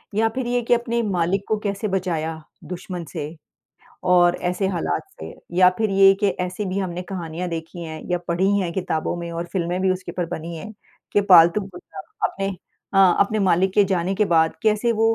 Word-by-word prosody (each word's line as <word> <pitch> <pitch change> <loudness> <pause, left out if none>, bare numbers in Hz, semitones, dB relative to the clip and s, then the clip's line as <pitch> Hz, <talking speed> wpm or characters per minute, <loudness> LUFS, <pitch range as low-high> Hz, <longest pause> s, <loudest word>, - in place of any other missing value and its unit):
या 225 +1 +3
फिर 260 -2 -2
ये 245 0 +1
कि 235 - +2
अपने 235 0 0
मालिक 190 -1 0
को 215 - +1
कैसे 200 0 -2
बचाया 165 -4 -2 0.2
दुश्मन 180 -1 -6
से, 155 -1 -5 0.7
और 180 -1 +4
ऐसे 180 +2 -1
हालात 165 - -1 0.2
से। 80 +1 -8 0.2
या 180 0 +7
फिर 220 -2 +1
ये 195 0 +7
कि 205 - +3 0.2
ऐसी 180 +3 -4
भी 185 +1 -2
हमने 180 -2 -3
कहानियाँ 175 -1 -4
देखी 165 +1 -6
हैं 160 -1 -7
या 180 - +1
पढ़ी 175 +3 +1
हैं 175 -3 -2
किताबों 175 -3 -2
में 170 0 -5
और 170 +1 -4
फ़िल्में 180 -1 -1
भी 190 - +3
उसके 185 0 -3
ऊपर 175 -2 -2
बनी 165 +2 -7
हैं 210 +7 -8 0.4
कि 205 - +4
पालतू 170 +4 +7
कुत्ता 180 +1 -11 0.3
अपने 195 0 -3 0.5
हाँ, 190 -2 +6
अपने 215 +2 +2
मालिक 190 -1 +2
के 205 - +5
जाने 185 0 0
के 210 +2 +2
बाद 160 -2 +3
कैसे 220 +2 +2
वो 225 +1 +2
185 Hz, 200 wpm, -22 LUFS, 170-200 Hz, 0.7 s, या